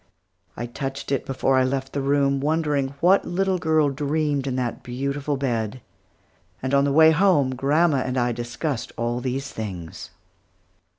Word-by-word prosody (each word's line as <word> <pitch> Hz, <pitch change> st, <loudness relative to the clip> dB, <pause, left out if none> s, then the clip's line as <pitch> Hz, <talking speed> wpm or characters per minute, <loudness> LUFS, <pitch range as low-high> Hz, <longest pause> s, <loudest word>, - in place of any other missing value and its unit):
I 120 Hz, -, -3 dB
touched 135 Hz, +3 st, -5 dB
it 140 Hz, -, -1 dB
before 135 Hz, 0 st, +2 dB
I -, -, +4 dB
left 135 Hz, +1 st, -2 dB
the 140 Hz, -, -1 dB
room, 140 Hz, 0 st, +2 dB
wondering 145 Hz, -2 st, 0 dB
what 185 Hz, +4 st, +5 dB
the -, -, -9 dB
little 190 Hz, +1 st, 0 dB
girl 155 Hz, -3 st, +2 dB
dreamed 145 Hz, 0 st, -1 dB
in 130 Hz, -, -1 dB
that 125 Hz, -2 st, -2 dB
beautiful 140 Hz, +3 st, -3 dB
bed; 120 Hz, -3 st, -2 dB, 0.8 s
and 130 Hz, +1 st, -3 dB
on 140 Hz, 0 st, +4 dB
the 140 Hz, -, +1 dB
way 160 Hz, +2 st, +7 dB
home, 160 Hz, -6 st, +3 dB
grandma 145 Hz, +4 st, +2 dB
and 130 Hz, 0 st, -2 dB
I 120 Hz, 0 st, +1 dB
discussed 120 Hz, +3 st, -4 dB
all 120 Hz, +1 st, -1 dB
these 130 Hz, +2 st, -3 dB
things. 90 Hz, -7 st, -7 dB
135 Hz, 165 wpm, -23 LUFS, 130-150 Hz, 0.8 s, way